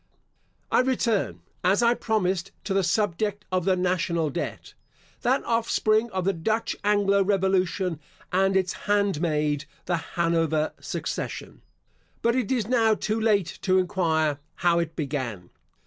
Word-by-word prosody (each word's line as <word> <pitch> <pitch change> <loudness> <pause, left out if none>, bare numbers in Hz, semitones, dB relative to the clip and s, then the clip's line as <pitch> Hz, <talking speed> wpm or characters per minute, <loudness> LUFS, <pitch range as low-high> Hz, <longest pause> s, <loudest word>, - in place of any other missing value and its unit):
I - - +4
return, 250 -4 0 0.2
as 195 +6 +3
I 235 0 +5
promised, 195 -7 -1
to 195 - -2
the 195 0 +2
subject 205 +2 0
of 185 -2 0
the 190 -1 +3
national 175 -3 0
debt, 170 - -5 0.5
that 260 +3 +2
offspring 230 -1 +2
of 185 -3 -3
the 195 - +2
Dutch 220 +7 -1
Anglo 200 -1 +3
revolution, 190 -3 +1 0.3
and 195 +1 +3
its 185 -2 0 0.2
handmaid 155 -7 +1 0.2
the 175 -1 0 0.2
Hanover 165 -2 +1
succession. - - -5 0.6
But 235 +1 +3
it 255 -4 0
is 235 -6 0
now 225 -3 +3
too 215 +1 -1
late 205 -6 +1
to 185 -1 +3
enquire 160 -5 +1 0.2
how 170 -1 +2
it 165 -1 -3
began. 130 - -4
190 Hz, 135 wpm, -26 LUFS, 170-215 Hz, 0.6 s, I